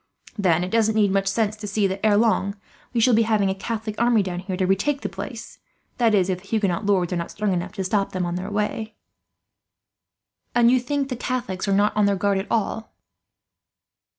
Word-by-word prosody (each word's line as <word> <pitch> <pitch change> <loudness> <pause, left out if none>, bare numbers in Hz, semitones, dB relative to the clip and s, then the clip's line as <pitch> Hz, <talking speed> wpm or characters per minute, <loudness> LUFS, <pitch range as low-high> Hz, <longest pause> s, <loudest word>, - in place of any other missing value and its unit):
Then 180 -5 +2
it 180 - -4
doesn't 220 -1 +2
need 205 -3 +3
much 195 0 +1
sense 215 +1 0
to 210 -1 -7
see 205 0 0
that, 195 +1 -2
ere 210 -2 +4
long, 205 -3 +2 0.4
we 240 - 0
shall 245 +2 +4
be 225 - +5
having 215 -3 +2
a - - 0
Catholic 215 +2 -4
army 235 -3 +4
down 180 -2 -4
here 185 0 -4
to 185 - +1
retake 205 +10 +1
the - - -3
place; - - -8 0.4
that 230 -3 +4
is, 185 -3 +3
if 185 -1 -2
the 195 - -18
Huguenot 200 -4 0
lords 185 -4 +2
are - - 0
not 170 - -4
strong 205 -2 -1
enough 180 +1 -3
to 195 - -3
stop 195 +1 0
them 185 -1 -2
on 175 - -3
their 180 +2 -4
way." 215 +1 -2 1.6
"And 240 0 +5
you 255 - +4
think 275 +2 -2
the 250 - -2
Catholics 235 -6 -3
are - - +1
not 205 +2 +2
on 210 -1 +3
their 200 - +2
guard 200 0 +1
at 195 - -5
all?" 225 0 -2
205 Hz, 220 wpm, -23 LUFS, 190-225 Hz, 1.6 s, be